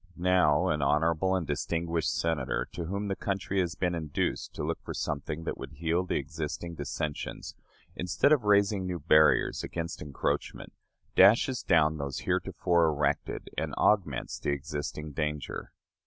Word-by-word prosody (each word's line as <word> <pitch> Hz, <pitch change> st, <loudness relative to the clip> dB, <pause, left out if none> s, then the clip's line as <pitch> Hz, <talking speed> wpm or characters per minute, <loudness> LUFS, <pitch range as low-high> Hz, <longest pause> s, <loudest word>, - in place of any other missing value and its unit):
Now, 90 Hz, -5 st, +3 dB
an 75 Hz, -1 st, 0 dB
honorable 80 Hz, +6 st, +2 dB
and 90 Hz, -3 st, -1 dB
distinguished 80 Hz, +2 st, -1 dB
Senator, 80 Hz, -1 st, -1 dB
to 85 Hz, -, -5 dB
whom 100 Hz, +4 st, -3 dB
the 95 Hz, -, -1 dB
country 100 Hz, 0 st, -2 dB
has 90 Hz, -1 st, 0 dB
been 90 Hz, -2 st, 0 dB
induced 80 Hz, -4 st, -2 dB
to -, -, -4 dB
look -, -, -2 dB
for -, -, -6 dB
something 75 Hz, +2 st, -3 dB
that -, -, -4 dB
would 70 Hz, +1 st, -8 dB
heal 85 Hz, +4 st, 0 dB
the 90 Hz, -, -2 dB
existing 75 Hz, +4 st, -4 dB
dissensions, 75 Hz, 0 st, -4 dB, 0.4 s
instead 90 Hz, -, +1 dB
of 145 Hz, -7 st, +4 dB
raising 100 Hz, -2 st, +3 dB
new 90 Hz, -1 st, -2 dB
barriers 75 Hz, 0 st, +4 dB
against 85 Hz, 0 st, -4 dB
encroachment, 70 Hz, -3 st, -3 dB, 0.4 s
dashes 115 Hz, +6 st, +5 dB
down 80 Hz, -1 st, +3 dB
those 70 Hz, -2 st, -4 dB
heretofore 85 Hz, -2 st, +1 dB
erected 75 Hz, -1 st, -1 dB
and -, -, -3 dB
augments 85 Hz, -11 st, +1 dB
the -, -, -2 dB
existing 75 Hz, +1 st, -4 dB
danger. 75 Hz, 0 st, -3 dB
80 Hz, 150 wpm, -29 LUFS, 75-90 Hz, 0.4 s, dashes